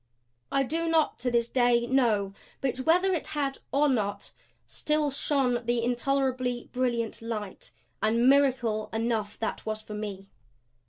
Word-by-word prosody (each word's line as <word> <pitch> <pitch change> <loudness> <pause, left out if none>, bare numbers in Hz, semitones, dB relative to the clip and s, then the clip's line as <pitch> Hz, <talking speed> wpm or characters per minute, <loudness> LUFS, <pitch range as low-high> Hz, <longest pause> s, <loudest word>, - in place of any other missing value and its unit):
I 275 - +3
do 330 +5 -2
not 325 -2 +2
to 250 - -1
this 235 -1 +1
day 240 -1 +3
know. 225 -7 +2 0.3
But 265 -2 -1
whether 355 +8 +3
it 340 - -2
had 275 -2 -1
or 290 +2 +3
not 205 -6 -1 0.3
still 300 -1 0
shone 265 -3 +1
the 240 -1 +1
intolerably 250 0 0
brilliant 240 -3 -1
light. 210 - -5 0.3
And 230 +3 +3
miracle 260 -6 +3
enough 220 -2 -1
that 225 - -3
was 215 0 -4
for 215 - -9
me. 205 -2 -6
245 Hz, 145 wpm, -28 LUFS, 220-275 Hz, 0.3 s, I